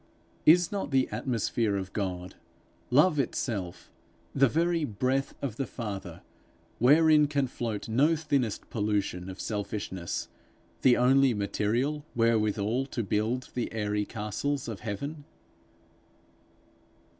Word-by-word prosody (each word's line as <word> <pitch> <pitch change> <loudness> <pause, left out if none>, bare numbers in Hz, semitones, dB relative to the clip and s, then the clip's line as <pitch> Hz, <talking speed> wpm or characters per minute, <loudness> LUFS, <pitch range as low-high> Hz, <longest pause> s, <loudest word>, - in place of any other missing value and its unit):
Is 175 +2 +6
not 200 -7 -3
the 135 -2 +2
atmosphere 115 -2 0
of 95 -1 -4
God, 90 -3 -3 0.6
love 150 +4 +4
itself, 100 -8 -3 0.4
the 135 0 +5
very 170 +2 +1
breath 130 +3 -1
of 120 -5 -3
the 135 - -2
Father, 95 -7 -6 0.6
wherein 150 +3 +6
can 140 -2 +1
float 115 -4 -4
no 140 +9 +3
thinnest 140 -8 -1
pollution 100 -4 -1
of 95 - -8
selfishness, 100 -4 -4 0.5
the 125 -2 +5
only 130 0 +4
material 120 +8 -1
wherewithal 115 +1 +1
to 120 -3 -3
build 110 +5 -1
the 125 - -2
airy 105 -1 -1
castles 115 +8 -3
of 110 -4 -5
heaven? 140 +8 -5
120 Hz, 115 wpm, -28 LUFS, 105-140 Hz, 0.6 s, Is